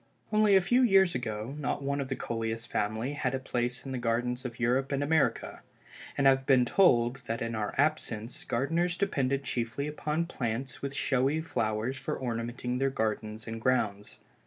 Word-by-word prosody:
Only 215 -2 +5
a 190 - +6
few 240 +8 +3
years 195 -7 +5
ago, 110 0 -4
not 140 0 -2
one 140 +1 -1
of 135 - -3
the 135 - -2
Coleus 115 -1 -3
family 110 +4 -2
had 145 -2 -1
a - - -2
place 125 -1 -2
in 135 - -5
the 130 - -2
gardens 120 +2 -1
of 120 -1 -6
Europe 125 +3 +1
and 140 0 0
America, 155 +1 +1 0.6
and 140 - +2
I - - +9
have 135 0 -1
been 130 -3 +5
told 120 -5 +3
that 115 +1 -2
in 115 0 -3
our 105 -2 -3
absence 145 -2 0
gardeners 170 +6 0
depended 140 -8 0
chiefly 120 +2 -2
upon 150 +2 -2
plants 125 -4 -4
with 140 0 -4
showy 135 +3 +1
flowers 115 -4 -1
for 135 - -4
ornamenting 125 +1 -3
their 135 0 +2
gardens 110 -3 -2
and 110 0 -5
grounds. 105 -5 0
130 Hz, 185 wpm, -29 LUFS, 115-140 Hz, 0.6 s, I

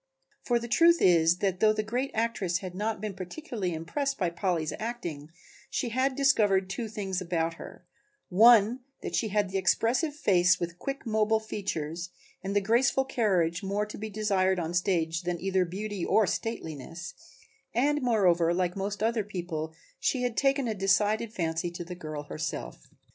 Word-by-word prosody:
For 240 - +1
the 235 0 -4
truth 335 +8 +5
is 170 -1 +4
that 185 -2 0
though 215 +1 +5
the 215 0 -1
great 245 +5 -2
actress 215 -6 0
had 185 -2 -7
not 210 +3 -2
been 210 -1 -4
particularly 190 - -4
impressed 275 - -2
by 180 -4 0
Polly's 170 -4 -1
acting 175 -11 -5 0.4
she 245 - -2
had 260 +3 0
discovered 205 -9 +3
two 230 +3 -3
things 195 -3 -3
about 170 -2 -1
her, - - -11 0.4
one 225 +4 +6 0.2
that - - -4
she 225 - +1
had 205 -2 0
the 195 - 0
expressive 250 - +1
face 180 -9 +3
with 170 0 -4
quick 275 0 -5
mobile 220 0 +2
features 175 -5 -4 0.3
and 195 +1 -3
the 205 - +4
graceful 240 +6 +2
carriage 185 -9 +1
more 200 +1 -1
to 210 - -9
be 220 +1 -5
desired 195 -3 +1
on 165 -1 -3
the - - -4
stage 170 -3 +1
than 175 -1 -3
either 190 -1 +1
beauty 200 +1 -4
or 220 - +3
stateliness 170 - -5 0.6
and, 290 +5 +1
moreover, 180 -8 +3
like 180 -1 0
most 200 +1 -3
other 225 -1 +1
people, 175 -5 -4 0.3
she 255 -2 0
had 245 -2 -1
taken 275 -1 +2
a 220 - 0
decided 210 +3 +1
fancy 165 -4 -2
to 175 0 -7
the 175 +1 -7
girl 155 -4 -6
herself. 155 +3 -6
195 Hz, 175 wpm, -28 LUFS, 175-225 Hz, 0.6 s, one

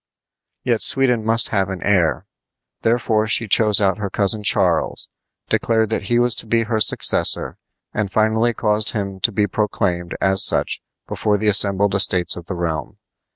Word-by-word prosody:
Yet 120 -3 -1
Sweden 125 -4 +2
must 115 +1 +1
have 95 -3 -1
an 95 -3 -7
heir. 90 -6 0 0.6
Therefore 110 -2 0
she 115 +1 +2
chose 105 +1 +3
out 100 -1 0
her 100 -2 -4
cousin 100 +2 -1
Charles, 95 -4 0 0.4
declared 110 -2 0
that 110 - -3
he 120 - +1
was 120 -1 +3
to - - +1
be 115 +1 0
her 110 -1 -2
successor, - - +1 0.3
and 105 -2 -3
finally 110 +2 0
caused 105 -1 0
him 100 -3 -5
to 115 - +1
be 105 0 0
proclaimed 90 -4 -3
as 95 0 +3
such - - +1 0.3
before 105 -1 -1
the 105 +1 0
assembled 100 -1 +2
estates 95 -2 +3
of 85 -1 -11
the 95 - -5
realm. 80 -3 -5
105 Hz, 165 wpm, -18 LUFS, 95-110 Hz, 0.6 s, chose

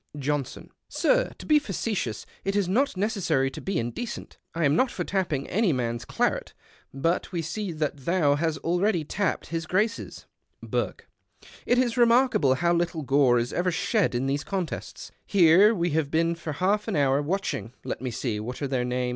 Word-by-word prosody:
Johnson. 145 -2 -3
— - - -57
" - - -56
Sir, - - +3
to - - -10
be 305 -1 +5
facetious, 195 - -3 0.2
it 195 +1 -1
is 200 -3 +1
not 255 +4 +1
necessary 190 - 0
to - - -8
be 195 -2 -2
indecent. 120 - -5 0.2
I 165 -1 +1
am 145 +1 +3
not 255 +9 +3
for 180 - -4
tapj)ing 170 -8 -1
any 210 -1 +2
mans 120 -3 -2
claret, - - -1 0.4
but 165 +9 -1
we 170 -3 -2
see 200 +4 -3
that 155 -2 -2
thou 150 +1 +2
hast 155 +1 0
already 175 +1 +1
tapped 185 +4 -2
his 165 -1 -3
Grace's." 210 +5 -1 0.4
Burke. - - -3 0.2
— - - -23
" - - -20
It 245 - +3
is 250 -1 +1
remarkable 235 - +4
how 170 +4 +2
little 170 -2 -1
gore 135 -2 +4
is 120 +1 -1
ever 180 +1 +1
shed 190 - +1
in 125 +2 0
these 140 +2 -1
contests. 185 -4 -5
Here 185 +1 +6
have 220 -1 +2
we 170 -1 0
been 165 +3 +1
for 165 -2 -5
half 200 +7 0
an 220 - -1
hour 140 -1 +3
watching 145 - -3
— - - -42
let - - -4
me 130 - -2
see, 115 -2 -3
what 120 +4 -6
are - - 0
their 130 -2 0
names? 125 0 -1
165 Hz, 200 wpm, -26 LUFS, 140-200 Hz, 0.4 s, Here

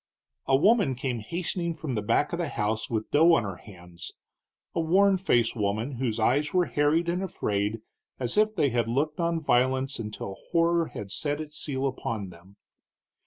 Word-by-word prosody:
A 135 - +4
woman 195 - +4
came 125 -2 -3
hastening 170 - -3
from 155 -4 -4
the 105 - -1
back 145 +10 +1
of 170 - -2
the 170 -4 -1
house 110 -1 -2
with 110 -2 -3
dough 165 +3 +6
on 120 - +1
her 95 -4 -5
hands, 90 -3 -11 0.6
a - - -1
worn 190 +4 +4
faced 120 - +2
woman, 110 +5 -2
whose 115 -3 -1
eyes 145 +8 +1
were 180 -1 +4
harried 155 +3 +1
and 175 +2 0
afraid 105 - -2 0.4
as 125 -2 -1
if 215 +1 +3
they 150 -6 +2
had 120 -1 0
looked 145 +7 -1
on 170 -1 +1
violence 130 -1 +1
until 105 -3 -6
horror 170 0 +2
had 100 -1 -8
set 145 +4 -1
its 155 -1 -6
seal 135 -2 -1
upon 115 -6 -3
them. 90 +4 -17
135 Hz, 180 wpm, -27 LUFS, 110-165 Hz, 0.6 s, dough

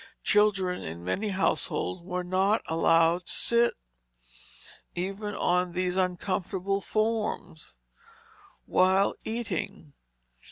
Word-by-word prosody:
Children 195 -3 +2
in 85 +2 -7
many 200 - -1
households 185 -1 0
were 180 +1 -3
not 190 +4 +1
allowed 165 +1 +3
to - - -3
sit, 235 0 +2 1.2
even 195 +3 -3
on 180 0 +1
these 180 0 -1
uncomfortable 190 +1 -1
forms, 215 - -2 0.9
while 190 +2 +3
eating. 205 -9 -4
185 Hz, 90 wpm, -28 LUFS, 180-205 Hz, 1.2 s, allowed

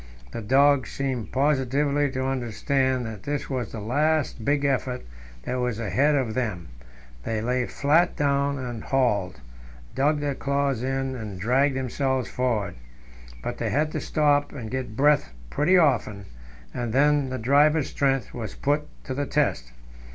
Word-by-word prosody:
The - - -5
dogs 135 +4 +3
seemed 130 -5 -3
positively 140 +1 +1
to 130 0 -3
understand 130 0 0
that 110 -3 -7
this 145 +2 -4
was 125 -4 -3
the 110 - -6
last 145 +3 0
big 145 +3 +1
effort 130 -2 -1 0.4
that 125 - -2
was 125 -3 -1
asked 110 -3 -4 0.2
of 130 -6 0
them; 105 - -3 0.5
they 110 -1 -2
lay 125 +2 0
flat 155 +5 +2
down 140 0 +1
and 120 -4 -5
hauled, 115 -9 0 0.5
dug 145 +4 +2
their 145 -1 -1
claws 140 -2 -1
in 135 0 -2
and 105 -6 -7
dragged 130 +7 +2
themselves 130 0 -1
forward. 115 - -1 0.7
But - - -4
they - - -1
had 155 +2 +1
to - - -3
stop 145 -2 +2
and 120 -6 -7
get 125 -4 -4
breath 145 - +3 0.2
pretty 170 +6 +3
often, 120 - +2 0.5
and 120 -2 -3
then 145 0 +3
the 130 - -3
driver's 145 +5 +3
strength 135 -3 0
was 110 -4 -6
put 145 +1 0 0.2
to 130 - -4
the 140 +1 -2
test. 100 - 0
130 Hz, 155 wpm, -25 LUFS, 120-145 Hz, 0.7 s, dogs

